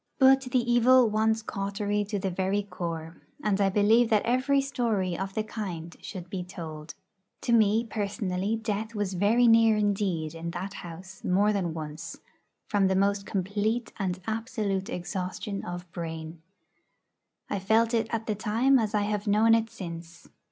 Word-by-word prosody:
But 270 Hz, 0 st, +6 dB
the 255 Hz, -, +2 dB
evil 240 Hz, +1 st, +5 dB
wants 220 Hz, +1 st, +1 dB
cautery 205 Hz, +1 st, -2 dB
to 205 Hz, +1 st, -3 dB
the 190 Hz, -1 st, -2 dB
very 190 Hz, +3 st, 0 dB
core, 165 Hz, -4 st, -5 dB, 0.3 s
and 205 Hz, -1 st, +1 dB
I 195 Hz, -, +4 dB
believe 220 Hz, +4 st, +4 dB
that 215 Hz, -3 st, +3 dB
every 260 Hz, +4 st, +2 dB
story 230 Hz, -9 st, 0 dB
of 195 Hz, +2 st, -4 dB
the 215 Hz, -, 0 dB
kind 175 Hz, -7 st, -6 dB
should 180 Hz, -2 st, -7 dB
be 180 Hz, 0 st, -4 dB
told. 160 Hz, -4 st, -8 dB, 0.5 s
To 235 Hz, -, 0 dB
me 220 Hz, 0 st, +4 dB
personally 205 Hz, -2 st, -2 dB
death 220 Hz, 0 st, -3 dB
was 205 Hz, -2 st, -1 dB
very 210 Hz, +7 st, +3 dB
near 225 Hz, -1 st, +6 dB
indeed 195 Hz, -7 st, 0 dB
in 165 Hz, +1 st, -5 dB
that 190 Hz, +2 st, -5 dB
house 180 Hz, +3 st, -10 dB
more 200 Hz, +3 st, +3 dB
than 175 Hz, -5 st, -1 dB
once, 155 Hz, -1 st, -6 dB, 0.5 s
from 200 Hz, -2 st, +2 dB
the 190 Hz, -, +1 dB
most 200 Hz, +1 st, +1 dB
complete 205 Hz, +5 st, -1 dB
and 185 Hz, -2 st, -1 dB
absolute 220 Hz, -4 st, -2 dB
exhaustion 185 Hz, +3 st, -4 dB
of 175 Hz, 0 st, -7 dB
brain. 160 Hz, -1 st, -6 dB, 1.1 s
I 200 Hz, -, -2 dB
felt 220 Hz, +4 st, +2 dB
it 225 Hz, -1 st, +1 dB
at 225 Hz, -1 st, -2 dB
the 215 Hz, -, 0 dB
time 230 Hz, +6 st, +2 dB
as 215 Hz, -1 st, -1 dB
I 210 Hz, -, +3 dB
have 210 Hz, 0 st, -2 dB
known 215 Hz, +2 st, +5 dB
it 225 Hz, 0 st, +2 dB
since. 170 Hz, -3 st, -9 dB
205 Hz, 165 wpm, -28 LUFS, 180-225 Hz, 1.1 s, But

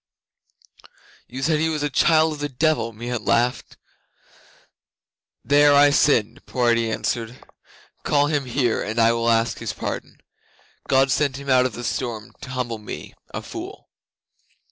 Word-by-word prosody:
'"You 130 Hz, +2 st, -7 dB
said 155 Hz, +1 st, +2 dB
he 160 Hz, +1 st, +1 dB
was 155 Hz, -2 st, -2 dB
a 145 Hz, -, 0 dB
child 160 Hz, +2 st, +3 dB
of 150 Hz, -, -9 dB
the 145 Hz, 0 st, -3 dB
Devil!" 135 Hz, -3 st, 0 dB
Meon 120 Hz, 0 st, -5 dB
laughed. 120 Hz, +2 st, 0 dB, 1.7 s
'"There 145 Hz, 0 st, +5 dB
I 145 Hz, 0 st, +6 dB
sinned," 120 Hz, -7 st, +2 dB
poor 120 Hz, -2 st, +1 dB
Eddi 115 Hz, -1 st, +1 dB
answered. 115 Hz, +2 st, -3 dB, 0.6 s
"Call 145 Hz, -1 st, +2 dB
him 145 Hz, -2 st, -1 dB
here, 125 Hz, -2 st, 0 dB
and 110 Hz, +2 st, -4 dB
I 115 Hz, 0 st, +5 dB
will 115 Hz, 0 st, 0 dB
ask 115 Hz, 0 st, +1 dB
his -, -, -4 dB
pardon. -, -, -6 dB, 0.7 s
God 135 Hz, 0 st, +3 dB
sent 140 Hz, 0 st, +1 dB
him 140 Hz, -1 st, -4 dB
out 130 Hz, 0 st, +4 dB
of 125 Hz, -, -10 dB
the 120 Hz, -, -7 dB
storm 115 Hz, -2 st, -4 dB
to 140 Hz, -, -9 dB
humble 125 Hz, -3 st, -3 dB
me, 105 Hz, -, -8 dB, 0.2 s
a -, -, -6 dB
fool." -, -, -9 dB
130 Hz, 155 wpm, -22 LUFS, 115-145 Hz, 1.7 s, I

